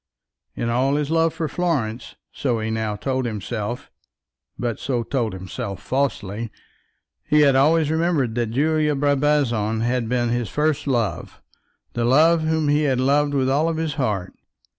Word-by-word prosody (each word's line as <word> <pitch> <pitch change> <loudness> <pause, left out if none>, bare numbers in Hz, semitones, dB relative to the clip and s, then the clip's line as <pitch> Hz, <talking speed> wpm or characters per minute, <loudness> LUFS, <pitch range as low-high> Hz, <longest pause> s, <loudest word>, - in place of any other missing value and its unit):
In 115 - -2
all 130 +4 +1
his 150 0 -1
love 165 0 +3
for 160 0 -3
Florence, 135 -9 -2 0.2
so 120 -5 -1
he 110 0 -2
now 110 -1 -2
told 130 +2 -2
himself, 110 +1 -5 0.7
but 120 -3 -3
so 125 -3 -1
told 115 -3 -2
himself 95 +1 -6
falsely, 115 -5 -2 0.7
he 150 0 +3
had 140 -2 +5
ever 145 +5 +5
remembered 160 -5 +1
that 120 -1 -1
Julia 150 +4 +1
Brabazon 135 -6 +1
had 120 -1 0
been 120 -1 +1
his 120 -2 -1
first 150 -1 0
love, 120 -6 -2 0.5
the 120 - -1
love 160 +7 +4
whom 155 -1 0
he 145 +1 +3
had 135 -4 +1
loved 145 +2 +2
with 130 -1 +1
all 150 +5 +2
his 160 -1 -2
heart. 105 - -2
130 Hz, 155 wpm, -22 LUFS, 115-150 Hz, 0.7 s, had